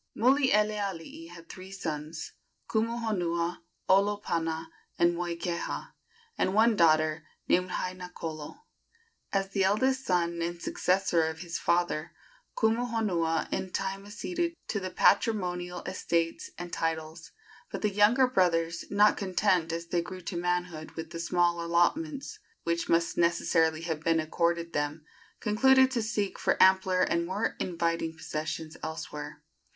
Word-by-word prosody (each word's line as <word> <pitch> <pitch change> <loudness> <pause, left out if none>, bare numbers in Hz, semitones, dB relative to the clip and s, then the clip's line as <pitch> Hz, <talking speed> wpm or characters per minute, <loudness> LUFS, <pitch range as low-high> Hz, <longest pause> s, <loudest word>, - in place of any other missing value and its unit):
Mulielealii 210 - +1
had 170 -1 -12
three 185 0 -10
sons 160 -4 -5 0.4
Kumuhonua, 210 -7 -1 0.3
Olopana 185 -5 +1 0.3
and 170 0 +4
Moikeha 170 0 -3 0.5
and 185 - +1
one 225 +1 +5
daughter, 155 -2 +3 0.2
named 180 +1 +2
Hainakolo. 180 - -5 0.7
As 195 -1 0
the 195 -1 +1
eldest 260 +7 +2
son 170 -4 0
and 170 +1 -3
successor 180 -2 +1
of 160 0 -5
his 175 -2 -4
father, 170 -1 0 0.4
Kumuhonua 220 -8 +1
in 190 - -2
time 195 +2 -3
acceded 340 +11 -3
to 205 - 0
the 185 -1 -4
patrimonial 180 -3 +1
estates 170 - -1
and 175 -1 -7
titles; 160 0 -3 0.4
but - - -5
the 210 - +2
younger 210 +6 +5
brothers, 170 -7 +1
not 205 +1 +4
content, 185 -3 +1
as 170 +1 -3
they 170 0 0
grew 185 +2 -8
to 175 +1 -5
manhood, 175 -2 -2
with 160 0 -6
the 165 - -6
small 170 0 +1
allotments 270 - 0 0.2
which 170 0 -1
must 170 0 +2
necessarily 165 -2 +2
have 165 -2 -3
been 165 +1 +2
accorded 170 +1 0
them, 145 +1 -2 0.3
concluded 260 +5 +4
to 245 -3 0
seek 215 -3 -2
for - - +1
ampler 190 -1 +5
and 170 0 +1
more 200 +5 -1
inviting 165 -2 -1
possessions 155 0 -4
elsewhere. 150 -2 -6
175 Hz, 130 wpm, -29 LUFS, 165-205 Hz, 0.7 s, one